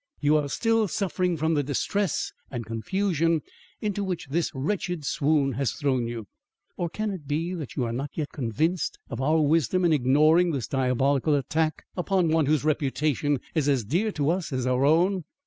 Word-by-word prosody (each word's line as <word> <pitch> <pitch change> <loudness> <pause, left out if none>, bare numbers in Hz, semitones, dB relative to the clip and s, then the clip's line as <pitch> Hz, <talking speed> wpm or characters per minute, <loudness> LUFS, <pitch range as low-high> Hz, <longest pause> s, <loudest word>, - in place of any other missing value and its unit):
You 150 +1 +3
are 145 -2 -1
still 225 - +2
suffering 180 -2 -1
from 160 +2 +1
the 145 - +2
distress 175 +8 -1 0.2
and 120 -3 -5
confusion 165 - 0 0.4
into 205 -1 -1
which 180 -7 -4
this 165 +4 0
wretched 170 +2 -2
swoon 145 -2 +2
has 135 -3 -1
thrown 130 -4 0
you. 115 -2 -5 0.5
Or 175 - -2
can 215 +5 -3
it 170 -7 -7
be 165 +5 -1
that 160 -7 -6
you 130 - 0
are 115 -1 -2
not 135 +4 -3
yet 150 -3 -3
convinced 150 - -1
of 115 - -3
our 155 +4 +3
wisdom 165 +3 +2
in 165 - +4
ignoring 155 +6 +4
this 130 -7 -2
diabolic 135 +1 +1
attack 155 +2 0
upon 180 -2 +1
one 160 -2 +2
whose 150 -2 +2
reputation 145 -1 0
is 150 -3 +1
as 130 -6 +1
dear 180 - 0
to 145 +1 +1
us 175 -2 -2
as 130 -2 -1
our 130 +1 +2
own? 175 +5 +3
155 Hz, 180 wpm, -26 LUFS, 135-175 Hz, 0.5 s, in